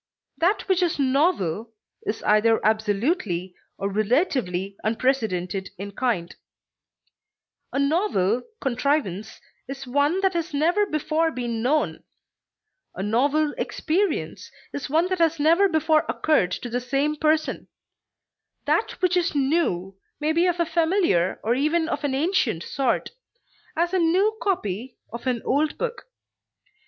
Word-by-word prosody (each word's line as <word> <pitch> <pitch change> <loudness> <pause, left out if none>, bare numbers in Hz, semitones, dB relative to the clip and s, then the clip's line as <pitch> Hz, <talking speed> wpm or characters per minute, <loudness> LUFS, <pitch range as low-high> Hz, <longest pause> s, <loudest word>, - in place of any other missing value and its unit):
That 390 +5 +1
which 380 -2 +2
is 350 -2 +1
novel 260 - +1 0.3
is 215 - -2
either 220 +2 +4
absolutely 210 - 0 0.2
or 195 - -2
relatively 200 - 0
unprecedented 215 -6 -1
in 200 +2 -6
kind; 200 -7 -2 1.4
a - - -3
novel 280 - +1 0.2
contrivance 250 - -1 0.3
is 270 0 -7
one 285 +8 +1
that 385 -1 +2
has 335 -3 -3
never 350 +8 +2
before 310 +1 0
been 240 -6 -3
known; 295 +6 0 0.9
a 190 - -4
novel 285 +8 +1
experience 365 +2 -1 0.2
is 285 - -4
one 325 +5 +2
that 370 -1 -1
has 330 -1 +2
never 335 +7 +4
before 315 -1 +3
occurred 305 - +2
to 245 - -5
the 245 +1 -1
same 275 +4 0
person; 310 +1 0 1.0
that - - +1
which 365 0 +3
is 350 -3 +1
new 265 - 0 0.2
may 305 +1 +1
be 340 +3 +3
of 350 -1 0
a 340 - +3
familiar 325 - +1
or 230 - +2
even 310 +5 +1
of 325 - -3
an 280 -2 0
ancient 270 - +1
sort, 265 -3 -1 0.6
as 345 +3 0
a 375 - +3
new 375 +6 +3
copy 245 - -2 0.2
of 235 +2 -6
an 245 -3 -1
old 295 +3 +1
book. 485 -1 -4
285 Hz, 135 wpm, -24 LUFS, 225-330 Hz, 1.4 s, either